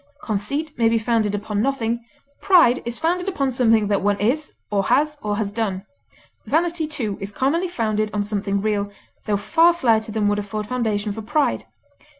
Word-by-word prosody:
Conceit 280 +8 -2
may 225 -1 +4
be 230 - +2
founded 220 -2 +1
upon 205 0 -2
nothing; 235 -2 -1 0.4
pride 340 -11 +5
is 235 0 -3
founded 355 +3 0
upon 275 -8 -1
something 225 -4 +3
that 200 -1 +1
one 205 0 +1
is, 270 +9 0 0.2
or 200 -1 +1
has, 295 +4 +1
or 205 -1 -2
has 205 -2 -2
done; 205 -4 -2 0.6
vanity, 330 0 0
too, 230 -10 -3
is 195 +1 -5
commonly 305 - 0
founded 215 -9 -1
on 205 0 -1
something 200 -1 -2
real, 205 -1 0 0.4
tho 205 -1 +1
far 330 - +4
slighter 225 -8 +2
than 215 -1 0
would 205 0 +1
afford 210 +1 -4
foundation 215 -3 -1
for 220 - -5
pride. 290 +7 0
225 Hz, 175 wpm, -22 LUFS, 205-280 Hz, 0.6 s, pride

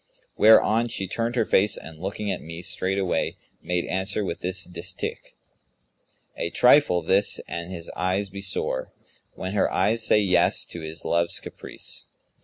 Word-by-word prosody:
Whereon 110 +1 +5
she 100 -5 -2
turned 115 +5 -2
her 120 - +2
face 100 +1 +3
and 80 -1 -10
looking 100 +3 -3
at - - -4
me, 85 +2 -8
straightway 95 +1 -1 0.2
made 90 -1 -2
answer 95 +2 -1
with 85 - -4
this 95 +1 -1
distich, 85 -1 -5 1.0
'A 85 - -2
trifle 125 - +4
this 95 +4 +3
an 85 +1 -5
his 85 -3 -7
eyes 95 +2 -1
be 100 +1 -7
sore, 90 -8 -1 0.2
* - - -30
When 95 +1 -5
her 105 - +1
eyes 115 +2 +1
say 110 - +4
'yes' 90 -5 +3
to 85 - -6
his 80 +1 -7
love's 85 0 +2
caprice!' - - -6
95 Hz, 160 wpm, -24 LUFS, 85-105 Hz, 1.0 s, Whereon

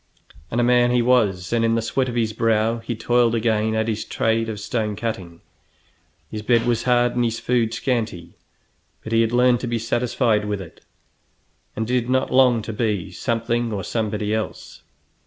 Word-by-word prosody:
And 120 - -1
a - - +3
man 120 0 +4
he 120 -1 +2
was, 105 -6 +2
and 115 -1 +2
in 115 0 +2
the 115 - +1
sweat 130 +3 -1
of 120 - -5
his 110 -2 0
brow 115 +1 +1
he 115 +1 -5
toiled 120 +1 +2
again 110 -1 +1
at 110 0 0
his 110 -1 -2
trade 115 0 0
of 105 -2 -5
stone 105 0 -2
cutting. 95 -6 -5 0.9
His 105 - -4
bed 115 +1 +2
was 120 -1 0
hard 120 -1 +3
and 120 - +1
his 115 -1 -1
food 120 -3 +1
scanty, 110 -11 -3 0.7
but 110 - -5
he 115 - +4
had 115 0 +1
learned 125 0 +3
to 125 - -4
be 120 0 -1
satisfied 115 -1 0
with 105 -1 -2
it, 90 -4 -11 0.9
and 110 - -2
did 125 +1 -1
not 130 +1 +1
long 125 -4 +4
to 110 - -5
be 105 -4 -2
something 115 +3 -1
or 100 -3 -3
somebody 105 0 -2
else. 110 0 -5
115 Hz, 190 wpm, -22 LUFS, 110-120 Hz, 0.9 s, man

